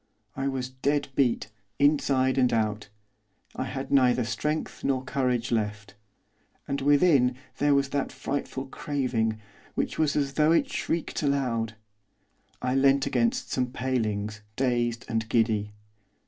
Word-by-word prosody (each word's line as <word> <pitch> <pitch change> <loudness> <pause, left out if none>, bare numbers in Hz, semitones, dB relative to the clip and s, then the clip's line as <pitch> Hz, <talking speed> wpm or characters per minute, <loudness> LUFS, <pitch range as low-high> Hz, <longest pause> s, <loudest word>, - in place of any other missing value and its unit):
I 135 0 -1
was 130 -2 -2
dead 140 +2 -1
beat, 125 -5 +1 0.3
inside 135 -3 +3
and 125 -1 +3
out. 110 -2 -1 0.7
I - - -2
had 135 0 -5
neither 125 -2 +4
strength 150 +8 -3
nor 130 -2 +1
courage 125 -4 -1
left. 105 -2 -2 0.7
And 140 -1 -2
within 140 -3 +4 0.2
there 145 -1 +4
was 140 -1 +2
that 140 0 -1
frightful 140 -1 -4
craving, 125 -6 -1 0.4
which - - -2
was 155 -2 +2
as 140 -2 0
though 155 +3 +4
it 275 +10 +2
shrieked 170 -6 -2
aloud. 125 -6 0 0.9
I 125 0 +1
leant 135 +1 +4
against 120 -3 0
some 125 -1 +1
palings, 110 -5 -2
dazed 120 -2 0
and 110 -2 -2
giddy. 110 -3 +1
130 Hz, 135 wpm, -27 LUFS, 115-140 Hz, 0.9 s, neither